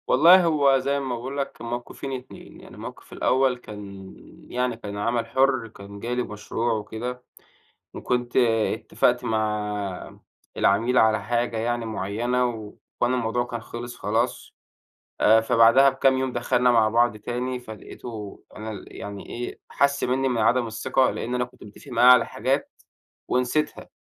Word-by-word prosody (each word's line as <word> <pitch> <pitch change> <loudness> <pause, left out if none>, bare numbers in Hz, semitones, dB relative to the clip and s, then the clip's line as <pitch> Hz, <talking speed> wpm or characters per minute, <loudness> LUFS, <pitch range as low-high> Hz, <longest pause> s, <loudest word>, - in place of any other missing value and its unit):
والله 175 +7 +7
هو 145 -4 +4
زي 140 +2 0
ما 130 -3 -3
باقول 130 +4 -6
لك 140 -1 -4
الموقِفين 120 +3 -5
2 130 -1 -9
يعني - - -13
الموقِف - - -10
الأول، 130 -1 +2
كان 100 -4 -10 0.4
يعني 125 -1 -1
كان 105 -3 -7
عمَل 115 +2 0
حُرّ، 130 -1 +2
كان 100 -1 -11
جالي 125 +3 -2
مشروع 110 +3 -3
وكده، 120 +3 -5 0.7
وكنت 125 -1 -2
اتفقت 115 -3 +2
مع 105 -3 -3 0.4
العميل 115 +6 +2
على 110 -2 +4
حاجة 120 +1 -1
يعني 120 +1 -1
مُعيّنة، 115 +4 -1
و 110 -4 -5 0.3
وأنا 120 +1 +2
الموضوع 120 0 -1
كان 120 -1 -5
خلص 120 +1 -7
خلاص، 115 +4 -1 0.7
آآ 110 +1 +6
فبعدها 115 +4 +5
بكام 135 0 +2
يوم 130 -1 -1
دخلنا 125 +1 +2
مع 115 -3 +4
بعض 120 0 +2
تاني، 125 +3 -4
فلقيتُه 110 -2 -9
أنا 110 +1 -6
ال 105 - -9
يعني 100 -1 -7
إيه 120 +1 -6
حَسّ 140 0 +1
مِنّي 135 +2 +1
من 125 -2 -1
عدم 120 +2 +3
الثقة، 130 +3 +1
لإن 125 - -4
أنا 125 0 +1
كنت 125 - -17
متفق 105 +7 -13
معاه 125 +2 +7
على 125 -2 +5
حاجات - - -1 0.6
ونسيتها. 125 +5 -1
120 Hz, 150 wpm, -24 LUFS, 110-125 Hz, 0.7 s, والله